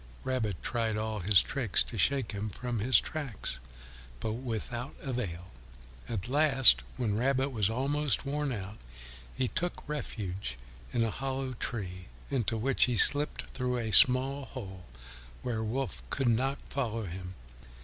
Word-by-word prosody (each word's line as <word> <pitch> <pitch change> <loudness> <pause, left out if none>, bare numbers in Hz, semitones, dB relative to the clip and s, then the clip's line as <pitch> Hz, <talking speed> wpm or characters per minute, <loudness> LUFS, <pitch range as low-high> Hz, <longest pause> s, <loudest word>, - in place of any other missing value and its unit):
Rabbit 110 -8 -2
tried 115 -2 -1
all 110 0 -2
his 95 0 +5
tricks 125 -9 +3
to - - -8
shake 130 +4 +2
him 105 +1 -4
from 120 +3 -4
his 115 +1 +4
tracks, 135 - -5 0.6
but 110 - -2
without 120 +1 -5
avail. 95 -10 -4 0.6
At 105 -3 -3
last, 135 - +5 0.2
when 110 -5 0
Rabbit 135 +2 +1
was 110 -6 0
almost 140 +5 0
worn 145 0 -1
out, 100 -2 -6 0.6
he 130 - 0
took 175 -2 -3
refuge 100 - -4 0.3
in 115 - +1
a 115 - 0
hollow 135 0 -3
tree, 90 -7 -5 0.2
into 115 -4 0
which 130 +4 +4
he 125 -3 -1
slipped 145 +7 +7
through 125 -1 -1
a 115 -2 -2
small 135 +3 +5
hole, 95 -9 -9 0.6
where 115 -3 -2
Wolf 130 +5 -3
could 135 -3 +1
not 135 +4 +1
follow 115 -5 -2
him. 90 +1 -7
120 Hz, 145 wpm, -30 LUFS, 105-135 Hz, 0.6 s, slipped